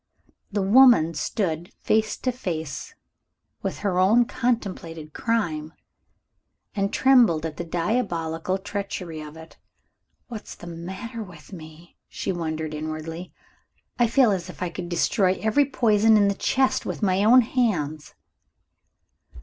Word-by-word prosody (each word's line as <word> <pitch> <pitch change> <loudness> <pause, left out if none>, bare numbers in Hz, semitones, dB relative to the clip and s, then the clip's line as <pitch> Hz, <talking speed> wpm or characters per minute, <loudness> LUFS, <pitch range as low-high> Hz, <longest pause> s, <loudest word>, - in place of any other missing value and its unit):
The 200 -1 0
woman 210 -6 +6
stood 170 0 -2
face 215 0 +1
to 255 - -1
face 165 - -5 0.7
with - - -3
her 185 -2 +1
own 220 +6 +5
contemplated 190 -11 -3
crime, 160 -10 -1 1.0
and 200 0 -1
trembled 235 - +4
at 160 -1 -5
the - - -3
diabolical 170 -1 -1
treachery 190 -5 -5
of 150 +1 -10
it. 160 0 -14 0.7
"What's 225 -4 -8
the - - -12
matter 190 +8 -7
with 180 -3 -12
me?" 160 0 -12
she - - -4
wondered 160 -3 -3
inwardly. 155 +3 -6 0.7
"I 240 - +5
feel 235 0 +4
as 185 -2 -2
if 180 - -6
I 175 - -3
could 175 0 -6
destroy 185 +2 +2
every 220 +7 +3
poison 220 -4 +3
in 200 -1 +4
the - - +1
chest 265 +6 +1
with - - -5
my 190 0 +2
own 245 +4 +7
hands." 180 - -1
185 Hz, 135 wpm, -24 LUFS, 165-220 Hz, 1.0 s, own